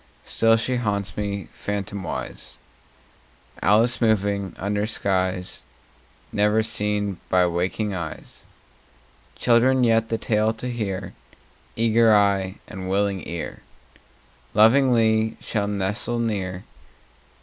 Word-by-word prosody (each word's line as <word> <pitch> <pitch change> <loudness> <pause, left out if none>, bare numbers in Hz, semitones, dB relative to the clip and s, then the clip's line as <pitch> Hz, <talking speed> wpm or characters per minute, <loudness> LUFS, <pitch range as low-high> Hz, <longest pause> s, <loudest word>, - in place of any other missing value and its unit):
Still 115 0 +3
she 125 +3 -1
haunts 100 -4 -2
me, 100 -1 -3
phantomwise, 100 -2 -5 1.0
Alice 115 +5 +3
moving 100 -4 +1
under 105 +2 -1
skies 95 -4 -1 0.7
Never 105 +2 +2
seen 105 -3 -1
by 90 -1 +4
waking 90 +4 -1
eyes. 85 -4 -7 0.9
Children 125 +2 +3
yet, 115 -1 +2
the 115 - 0
tale 110 0 +1
to 125 +3 -5
hear, 100 -5 -4 0.6
Eager 115 -1 +4
eye 100 -2 +2
and 95 -1 -7
willing 100 -1 0
ear, 85 0 -6 0.9
Lovingly 110 -1 +4
shall 105 -3 -2
nestle 105 +4 -1
near. 95 -5 -2
105 Hz, 100 wpm, -23 LUFS, 95-115 Hz, 1.0 s, by